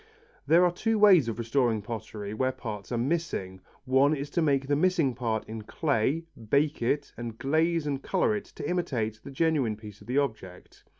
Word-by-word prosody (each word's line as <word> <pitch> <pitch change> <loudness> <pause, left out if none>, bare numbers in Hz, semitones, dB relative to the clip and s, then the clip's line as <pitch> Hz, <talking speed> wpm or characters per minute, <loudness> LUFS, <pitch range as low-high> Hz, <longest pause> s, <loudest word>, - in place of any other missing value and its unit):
There 170 +3 +6
are 175 - +3
two 220 +5 0
ways 190 - +6
of 115 - -3
restoring 115 -2 +1
pottery 105 -2 -6
where 130 +4 0
parts 110 -6 -7
are 120 - 0
missing. 120 - -2 0.2
One 135 +3 +4
is 140 0 -5
to 170 - +1
make 140 -3 +2
the 145 +1 +1
missing 165 -4 +2
part 115 -3 -2
in 110 0 -6
clay, 145 +5 0 0.2
bake 145 +2 +2
it, 130 +5 -1
and 115 -2 -6
glaze 160 +5 +1
and 140 -2 -2
colour 200 +6 +1
it 210 - -4
to - - -5
imitate 120 -12 -1
the - - -8
genuine 140 -6 +1
part 105 -2 -12
of 105 - -15
the 125 +3 -1
object. 110 -10 -4
135 Hz, 190 wpm, -28 LUFS, 110-160 Hz, 0.2 s, There